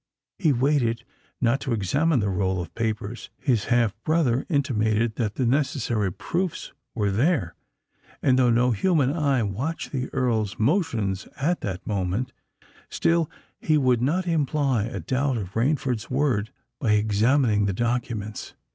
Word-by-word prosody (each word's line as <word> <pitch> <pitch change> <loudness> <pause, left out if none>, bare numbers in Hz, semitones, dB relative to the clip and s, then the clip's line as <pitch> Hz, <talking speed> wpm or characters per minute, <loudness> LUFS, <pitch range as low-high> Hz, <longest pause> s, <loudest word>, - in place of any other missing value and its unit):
He 160 -6 +3
waited 125 -3 +1 0.4
not 120 +2 +2
to 130 -3 -2
examine 130 - +1
the 100 - 0
roll 95 0 0
of 85 -1 -6
papers: 110 0 -3
his 120 -6 0
half 120 -4 +2
brother 150 -6 +1
intimated 115 -7 +1
that 110 -3 -1
the 130 - 0
necessary 120 - 0
proofs 170 - -3 0.2
were 105 -4 +1
there—and, 130 - -1
though 125 -2 +4
no 120 +2 +3
human 145 - +2
eye 140 -7 +1
watched 125 - -3
the 130 -2 -3
Earl's 110 -5 0
motions 110 - 0
at 170 +6 0
that 95 -3 -4
instant, 100 +4 -1 0.6
still 165 -2 +1 0.3
he 155 -1 +2
would 125 -4 +2
not 170 +8 +1
imply 145 -7 +1
a 105 -4 -5
doubt 130 - 0
of 100 -3 -5
Rainford's 125 -1 0
word 125 -6 +1 0.3
by 110 -6 +2
examining 105 +1 +3
the 100 - 0
documents. 115 -2 -3
120 Hz, 140 wpm, -25 LUFS, 105-140 Hz, 0.6 s, though